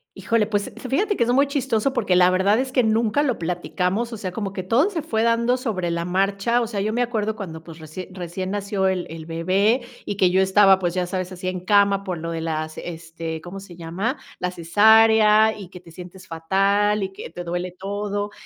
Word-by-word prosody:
Híjole, 230 -2 0
pues 205 -2 -2 0.2
fíjate 410 - +1
que 235 - +1
es 240 - +1
muy 275 +3 +4
chistoso 270 -3 -1
porque 185 -8 +1
la 180 0 +5
verdad 190 +3 +3
es 260 0 -2
que 255 - +2
nunca 220 +4 +2
lo 265 -6 0
platicamos, 180 +6 -2
o - - -5
sea, 190 -3 -5
como 195 +1 -4
que 190 -1 -5
todo 245 - +2
se 335 -7 -4
fue 220 -8 -1
dando 235 +2 +2
sobre 200 -9 -2
la 170 0 -2
marcha. 195 +6 +1
O - - 0
sea, 215 -3 -4
yo 215 +2 -1
me 240 +2 +1
acuerdo 220 -3 -2
cuando, 165 -6 -7
pues, 165 -1 -11
recién 165 +4 -9
recién 185 +1 -5
nació 200 -1 -1
el 185 -2 -1
el 160 -1 -8
bebé 190 +9 +1 0.2
y 205 - -4
que 185 -2 +3
yo 190 +1 +3
estaba, 190 0 +5
pues 175 -1 -2
ya 180 -1 0
sabes, 185 0 -4
así 185 0 -6
en 185 0 -2
cama 200 +1 +3
por 185 -3 -4
lo 165 +1 -5
de 165 -1 -3
las 155 -1 -3
este 165 -1 -6
¿cómo 180 +3 -8
se 195 -3 -12
llama? 180 - -3 0.2
La 180 - -1
cesárea 215 +4 +5
y 195 -4 -10
que 180 - -11
te 170 -1 -16
sientes 180 +2 -11
fatal 195 +5 +1
y 190 - -2
que - - -8
te 175 +2 -7
duele 175 +1 -3
todo 205 +1 -3
195 Hz, 225 wpm, -22 LUFS, 180-220 Hz, 0.2 s, la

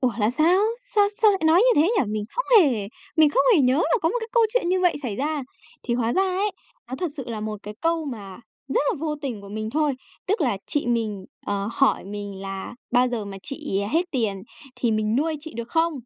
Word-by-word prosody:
"Ủa, 250 -2 +2
là 210 +2 +2
sao? 325 +8 +3 0.3
Sao 410 -1 +5
sao 430 - +8
lại 390 - 0
nói 330 +3 +6
như 475 -9 +5
thế 345 - +2
nhỉ?" - - +3
Mình 210 -1 -2
không - - -2 0.2
hề 235 - +1 0.3
mình 310 -2 +6
không - - +3
hề 330 - +5
nhớ 255 -1 +4
là 410 +10 +2
có 325 - +3
một 445 - -1
cái 450 - -5
câu 470 -2 +5
chuyện - - +2
như 370 0 +2
vậy 355 -4 +3
xảy 220 -6 -3
ra. 295 +2 -1 0.4
Thì 240 - -1
hóa 235 -1 0
ra 380 - +3
ấy 385 +2 0 0.4
nó 260 - -4
thật 355 -3 -2
sự 270 - -5
là 225 -3 -4
một 215 -1 -4
cái 210 +1 -7
câu 330 -1 +1
mà 210 -7 -7 0.3
rất - - +2
là - - -1
vô 305 0 -2
tình 245 -7 -4
của 200 - -11
mình 215 +2 -4
thôi, 300 +1 +1 0.3
tức 395 -1 0
là 240 -9 +1
chị 290 -4 -1
mình, 220 -5 -1 0.2
ờ, 200 0 -1
hỏi 275 +2 +2
mình 200 -1 -6
là 195 +3 -6 0.2
bao 250 0 +4
giờ 230 -4 -3
mà 195 -1 -7
chị 275 -9 -3
hết 355 +3 +1
tiền 215 - -1 0.3
thì 235 - 0
mình 215 +1 +1
nuôi 310 +3 0
chị 320 +1 -9
được 235 0 -5
không. 330 +3 +2
265 Hz, 245 wpm, -24 LUFS, 215-330 Hz, 0.4 s, sao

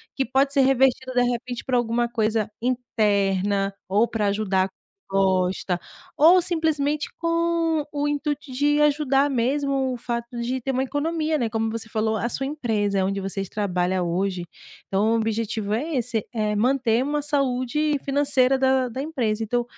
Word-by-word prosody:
que 270 - +1
pode 270 +3 +1
ser 280 - +4
revertido 265 -1 +2
de 245 0 +3
repente 245 0 -3
para 255 - 0
alguma 240 0 +1
coisa 220 -2 0
interna 200 -5 0 0.2
ou 210 +5 +3
para 215 -3 -1
ajudar 195 -2 +1 0.4
gosta 185 -2 +1 0.4
ou 345 +5 +7
simplesmente 310 -4 0
com 335 -2 +1
o 290 0 0
intuito 290 -1 -2
de 290 +3 +2
ajudar 290 -1 +3
mesmo 270 +1 0
o - - -4
fato 235 0 -3 0.2
de 250 +2 -2
ter 270 +2 -2
uma 260 0 0
economia, 310 +3 -1
né. 240 -5 0
Como 225 0 -1
você 225 0 -5
falou, 220 0 -1
a 230 - -1
sua 270 +2 -3
empresa, 220 -9 -1
é 190 - +2
onde 195 +1 -1
vocês 195 0 -4
trabalha 185 -2 -1
hoje. 180 +1 -1 0.4
Então 205 +3 +1
o - - +3
objetivo 220 -1 -1
é 300 +7 -3
esse, 235 -3 -1
é 215 -2 0
manter 245 +1 +2
uma 295 +2 -1
saúde 285 +1 0
financeira 275 -2 +2
da 265 -1 +2
da 240 - -6
empresa. 240 -8 -1
Então, 240 +2 0
245 Hz, 165 wpm, -24 LUFS, 215-280 Hz, 0.4 s, ou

